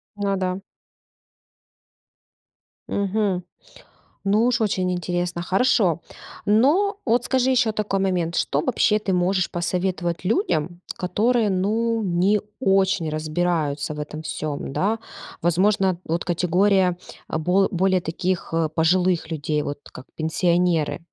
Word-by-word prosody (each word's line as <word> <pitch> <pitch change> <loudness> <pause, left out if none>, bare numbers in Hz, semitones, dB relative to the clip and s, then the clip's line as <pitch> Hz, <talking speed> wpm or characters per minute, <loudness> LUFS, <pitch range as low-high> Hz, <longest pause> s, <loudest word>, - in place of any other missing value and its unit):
Ну 200 -1 -1
да. 185 0 -2 2.3
Мгм. 200 -2 0 0.8
Ну 210 +4 +3
уж 240 -2 +1
очень 185 -3 0
интересно! 175 -1 -2
Хорошо. 185 - +2 0.4
Но 295 - +3
вот 240 0 +2
скажи 260 -1 +2
еще 240 -3 +3
такой 210 -2 -1
момент: 180 -3 0
что 145 - +1
вообще 210 +5 +2
ты 195 -2 -2
можешь 180 +1 +1
посоветовать 175 0 -2
людям, 180 - 0 0.2
которые 220 +4 +1
ну 225 +5 0
не 190 +3 +2 0.2
очень 195 -6 +2
разбираются 155 -2 -1
в 150 - -8
этом 155 +1 -6
всём, 155 -3 -4
да? 220 +3 0 0.4
Возможно, 185 +2 +2
вот 170 +2 -2
категория 180 +1 +2 0.3
бол 180 +5 +2
более 185 0 +2
таких, 175 +2 -2
э, 165 -1 +1
пожилых 170 +1 +1
людей, 150 -1 -1
вот 145 0 -5
как - - -11
пенсионеры? 170 -1 +1
185 Hz, 115 wpm, -23 LUFS, 170-205 Hz, 2.3 s, Ну